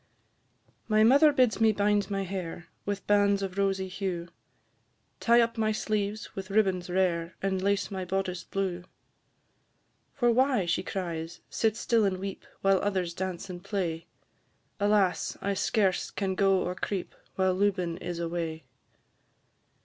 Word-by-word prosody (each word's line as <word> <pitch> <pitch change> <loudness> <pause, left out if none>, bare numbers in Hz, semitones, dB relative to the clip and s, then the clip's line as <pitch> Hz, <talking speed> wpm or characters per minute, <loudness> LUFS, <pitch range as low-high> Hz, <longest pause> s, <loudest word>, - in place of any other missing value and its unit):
My 215 -1 +4
mother 280 +7 +7
bids 250 -5 +2
me 220 -1 +6
bind 205 0 +1
my 195 -1 -1
hair 175 -2 -5 0.2
With 200 -1 -3
bands 200 -1 +3
of 190 -1 -4
rosy 195 -1 0
hue, 185 -2 -4 0.9
Tie 235 0 +5
up 230 0 0
my 215 0 +2
sleeves 215 0 -2
with 190 0 -6
ribbons 190 -3 +1
rare, 175 -2 0
And 190 -1 -1
lace 200 +1 0
my 190 -1 -3
boddice 185 -1 -2
blue. 185 -2 -3 1.3
"For 240 -3 +3
why," 255 -4 +3
she 170 +1 0
cries, 170 -3 -5
"sit 220 -1 +1
still 230 -2 +2
and 195 -2 +1
weep, 195 +1 -6
While 195 -1 +4
others 185 -4 -1
dance 185 +1 -4
and 180 -2 -8
play?" 175 -5 -3 0.7
Alas! 205 -3 +2
I 200 - -1
scarce 195 -1 +1
can 195 -2 -2
go 195 0 +3
or 180 - -2
creep, 185 0 -4 0.2
While 190 -1 +2
Lubin 185 -3 0
is 175 -1 -5
away. 165 -1 -3
195 Hz, 145 wpm, -28 LUFS, 180-205 Hz, 1.3 s, mother